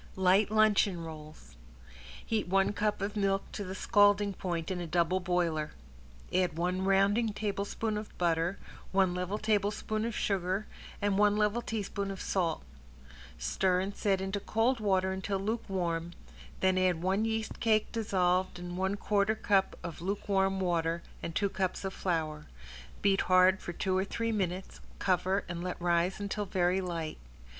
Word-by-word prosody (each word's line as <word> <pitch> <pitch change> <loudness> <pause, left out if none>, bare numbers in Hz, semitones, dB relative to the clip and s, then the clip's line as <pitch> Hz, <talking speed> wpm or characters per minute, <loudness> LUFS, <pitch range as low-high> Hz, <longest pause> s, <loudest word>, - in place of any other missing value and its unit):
~LIGHT 190 +2 +4
LUNCHEON 210 -5 +3
ROLLS~ 155 - -10 0.7
Heat 220 -4 -1
one 195 +2 +2
cup 210 -1 -1
of 205 +1 -3
milk 195 -1 +1
to 205 - -4
the 190 0 -6
scalding 205 0 +4
point 175 -2 -3
in 180 -1 -2
a 175 - -4
double 175 +2 +2
boiler, 170 -4 0 0.6
add 180 -3 +1
one 180 +2 0
rounding 200 +3 +3
tablespoon 210 +1 -2
of 210 - -10
butter, 170 +1 +1 0.3
one 190 -2 +3
level 180 +3 -2
tablespoon 215 0 0
of 230 - -3
sugar, 190 +1 0 0.4
and 200 -1 +2
one 210 0 +4
level 210 +2 +2
teaspoon 205 -3 -3
of 195 -1 -5
salt. 170 -5 -1 0.7
Stir 180 - +1
and 195 +2 -3
set 195 -2 +1
into 195 +1 -2
cold 230 +5 +1
water 190 -3 +2
until 190 +1 -2
lukewarm, 185 -5 -2 0.5
then 185 0 +3
add 180 -2 +1
one 190 +3 +1
yeast 225 0 -2
cake 215 -2 +2
dissolved 185 -5 +1
in 175 0 -6
one 190 +2 0
quarter 205 +1 +1
cup 195 -3 +1
of 170 -2 -6
lukewarm 195 0 0
water, 170 -2 0 0.2
and 165 - -5
two 200 - +2
cups 190 0 -2
of 190 - -3
flour. 155 -4 -2 0.6
Beat 195 -1 +4
hard 185 +1 +4
for - - -5
two 185 +2 -1
or - - +1
three 230 +3 -2
minutes, 190 -3 -3 0.2
cover, 190 +1 +1
and 175 -1 -5
let 180 - -4
rise 175 +2 +1
until 205 +1 -2
very 185 0 +1
light. 165 -4 -4
190 Hz, 160 wpm, -31 LUFS, 180-205 Hz, 0.7 s, ~LIGHT